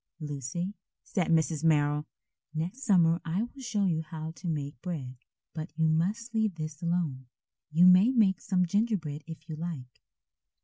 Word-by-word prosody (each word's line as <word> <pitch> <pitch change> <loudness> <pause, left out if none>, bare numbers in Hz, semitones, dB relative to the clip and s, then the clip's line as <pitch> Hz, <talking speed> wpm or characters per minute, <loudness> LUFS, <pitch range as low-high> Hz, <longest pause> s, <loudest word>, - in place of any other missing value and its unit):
"Lucy," 150 +5 -4 0.3
said 185 -5 -1
Mrs. 160 -1 +2
Merrill, 150 -1 +3 0.5
"next 180 - -3
summer 170 -5 +4
I 175 +6 -1
will 255 +3 -9
show 220 -5 0
you 165 -4 +1
how 160 0 -6
to 175 +2 -8
make 145 -5 -3
bread, 140 -8 -5 0.4
but 155 -1 -7
you 160 0 +3
must 205 +9 0
leave 220 -4 +1
this 155 -1 -6
alone. 165 -7 -1 0.4
You 170 +4 +6
may 185 +5 +8
make 215 -7 +3
some 185 -3 +1
gingerbread 175 -7 0
if 160 -1 -9
you 155 - -6
like." 155 -7 -6
165 Hz, 160 wpm, -29 LUFS, 155-190 Hz, 0.5 s, may